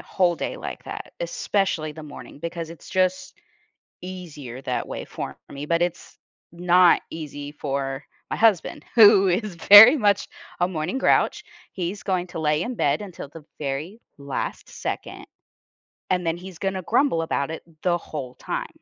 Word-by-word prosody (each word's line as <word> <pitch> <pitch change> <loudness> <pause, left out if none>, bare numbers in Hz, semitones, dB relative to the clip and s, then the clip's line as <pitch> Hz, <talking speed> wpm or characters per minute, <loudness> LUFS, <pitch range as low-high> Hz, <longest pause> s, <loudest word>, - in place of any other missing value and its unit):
whole 175 -3 +1
day - - -4
like - - -7
that, - - -8
especially 195 - -1
the 155 +1 -10
morning 145 -1 -11
because 170 +1 -5
it's 165 - -12
just 185 0 0 0.7
easier 155 -9 -8
that 125 -1 -2
way - - -6
for - - -7
me, 140 +1 -6
but 170 +2 +1
it's 175 -1 -3 0.3
not 175 +1 +4
easy 145 -2 -7
for 135 -2 -3 0.3
my - - -2
husband 220 -6 +2
who 205 -4 +8
is 190 +1 -1
very 205 - +10
much 205 -5 +2 0.3
a 175 - +3
morning 175 +5 -3
grouch, 265 - +2 0.3
he's 185 +2 -4
going 185 -2 -1
to 175 - -7
lay 150 0 +1
in 245 +1 -4
bed 145 0 +1
until 180 -8 -8
the 155 -1 -13
very 150 +10 -4 0.2
last 140 -1 -5
second, - - -6 0.8
and 180 -1 0
then 165 0 0
he's 180 -1 -11
gonna 190 -1 -2
grumble 240 - +2
about 140 -3 -1
it 160 - -7 0.2
the 175 -1 +2
whole 135 -6 -7
time. - - -4
175 Hz, 160 wpm, -24 LUFS, 150-190 Hz, 0.8 s, very